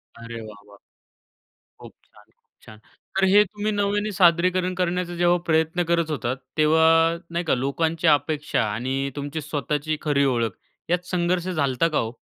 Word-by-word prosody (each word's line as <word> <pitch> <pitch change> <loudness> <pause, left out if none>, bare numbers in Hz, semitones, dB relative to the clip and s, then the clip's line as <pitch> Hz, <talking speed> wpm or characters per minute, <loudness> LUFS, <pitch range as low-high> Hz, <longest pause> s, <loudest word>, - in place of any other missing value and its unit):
अरे 115 0 -8
वाह 105 -2 -11
वाह! 100 0 -17 1.0
खूप - - -12
छान, - - -22
खूप - - -44 0.2
छान. 110 - -13 0.4
तर 195 - +3
हे 205 +1 +7
तुम्ही 210 +2 -3
नव्याने 205 +1 0
सादरीकरण 180 +1 +3
करण्याचा 180 0 -1
जेव्हा 175 +1 +3
प्रयत्न 160 +2 +1
करत 170 -2 +1
होतात 130 -4 -2 0.2
तेव्हा 160 +1 +4 0.4
नाही 170 +1 -2
का 160 - +2
लोकांची 160 +6 -1
अपेक्षा 150 +1 -2
आणि 130 +5 -2
तुमची 145 +2 -4
स्वतःची 150 +1 -2
खरी 145 -2 +2
ओळख 115 -1 0 0.4
यात 180 0 +1
संघर्ष 180 0 0
झाला 155 -7 0
होता 130 +6 +1
का 155 - -1
हो? 115 +1 -3
160 Hz, 160 wpm, -23 LUFS, 140-175 Hz, 1.0 s, हे